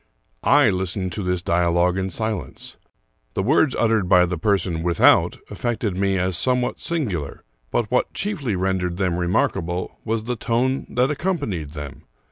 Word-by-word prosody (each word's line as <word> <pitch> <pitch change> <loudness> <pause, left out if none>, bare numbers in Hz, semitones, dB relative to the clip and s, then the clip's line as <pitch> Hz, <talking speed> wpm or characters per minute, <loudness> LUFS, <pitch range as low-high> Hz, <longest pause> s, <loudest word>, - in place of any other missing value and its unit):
I 140 -6 +5
listened 95 0 -2
to 95 - -4
this 90 -2 -1
dialogue 85 +1 +2
in 95 0 -1
silence. 110 0 -4 0.6
The 95 - 0
words 140 +3 +3
ut 115 -1 +2
tered 105 -5 +1
by 90 -1 +6
the 90 0 -2
person 90 -2 0
without 85 0 +4
affected 115 -5 -2
me 95 0 +1
as 90 0 0
somewhat 125 +6 0
singular; 100 - -3 0.3
but 115 -3 -1
what 125 - +1
chiefly 155 - -2
rendered 90 -1 -1
them 90 -3 0
remarkable 90 0 -1
was 110 0 -1
the 125 +2 -2
tone 125 +4 0
that 125 +3 +1
accompanied 140 - -2
them. 75 -3 -7
95 Hz, 155 wpm, -22 LUFS, 90-120 Hz, 0.6 s, by